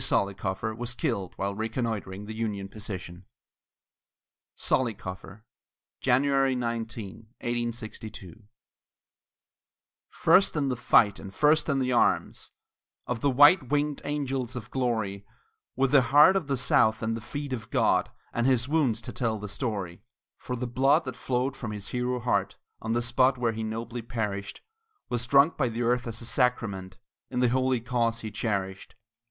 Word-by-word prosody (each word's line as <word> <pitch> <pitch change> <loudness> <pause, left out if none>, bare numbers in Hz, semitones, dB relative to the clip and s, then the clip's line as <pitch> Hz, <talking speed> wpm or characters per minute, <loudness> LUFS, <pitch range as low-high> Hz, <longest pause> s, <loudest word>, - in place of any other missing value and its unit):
Zollicoffer 100 +2 -1
was 120 +1 -5
killed 115 - -2
while 100 +1 -2
reconnoitring 110 -3 -3
the 110 - -6
Union 105 -3 -3
position. 95 -4 -7 1.3
ZOLLICOFFER 105 -3 -2 0.5
[January 135 +1 +2
19, 115 -3 -4
1862] 110 -4 -5 1.6
First 195 -2 +4
in 140 -3 0
the 125 - 0
fight, 105 -3 +4
and 100 - -9
first 150 +8 +3
in 140 - +2
the 130 -1 0
arms 120 - +1 0.6
Of 120 -2 -3
the 140 - +3
white 145 +2 +6
winged 145 0 0
angels 135 -4 -2
of 120 -1 -7
glory, 110 -6 -1 0.5
With 135 0 +1
the 140 - +7
heart 145 +9 +6
of 190 -7 0
the 135 -2 0
South 110 -3 +3
at 110 +1 0
the 115 - -4
feet 145 +3 -5
of 110 -4 -6
God, - - +2 0.2
And 120 +2 +1
his 130 -2 +2
wounds 135 -8 +1
to 125 - -7
tell 115 -3 -1
the 105 0 -6
story; 100 -5 -4 0.4
For 125 - -4
the 125 +1 -3
blood 135 +6 +3
that 130 -2 -5
flowed 130 +2 -1
from 125 -4 -6
his 105 -2 -6
hero 125 0 -1
heart, 120 +1 0 0.3
On 115 0 -2
the 120 +1 0
spot 130 +2 +3
where 120 -2 0
he 110 - -5
nobly 115 +2 -4
perished, 105 -4 -4 0.5
Was 120 0 -1
drunk 140 +5 +5
by 130 -4 +1
the 115 +1 -3
earth 125 +1 +1
as 115 0 -5
a - - -7
sacrament 110 -7 -1 0.3
In 125 - -2
the 125 -1 +3
holy 130 0 +1
cause 115 -1 -1
he 110 - -6
cherished! 95 -3 -3
120 Hz, 155 wpm, -27 LUFS, 110-130 Hz, 1.6 s, the